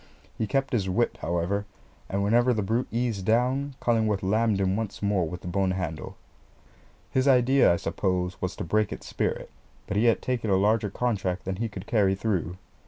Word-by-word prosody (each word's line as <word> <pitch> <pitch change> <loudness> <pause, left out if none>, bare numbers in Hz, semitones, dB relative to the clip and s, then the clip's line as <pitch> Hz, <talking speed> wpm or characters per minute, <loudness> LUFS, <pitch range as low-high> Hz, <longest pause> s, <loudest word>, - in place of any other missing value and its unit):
He 110 - -2
kept 135 +6 0
his 100 -5 +1
whip, 115 +6 +1
however; 90 +4 -1 0.4
and 100 +1 -1
whenever 120 +4 +3
the 105 - 0
brute 115 +6 0
eased 115 -4 -1
down, 130 +6 +1
Cullingworth 110 -4 +1
lammed 105 +1 +2
him 95 0 +1
once 110 -1 -4
more 100 -5 +1
with 90 +2 -7
the - - -8
bone 95 +1 +1
handle. 90 -5 -4 0.9
His 130 +1 +1
idea, 130 -1 +5
I - - +3
suppose, 90 +1 -2
was 90 0 -2
to - - -5
break 105 +5 +1
its - - -7
spirit, - - -2 0.3
but 100 - -3
he 110 - +3
had 115 - +4
taken 120 -4 -1
a 95 - +4
larger 105 +2 +2
contract 95 -5 -2
than 95 0 -3
he 115 +2 -2
could 100 -2 -8
carry 100 -4 +2
through. 95 -4 -2
105 Hz, 190 wpm, -26 LUFS, 95-115 Hz, 0.9 s, idea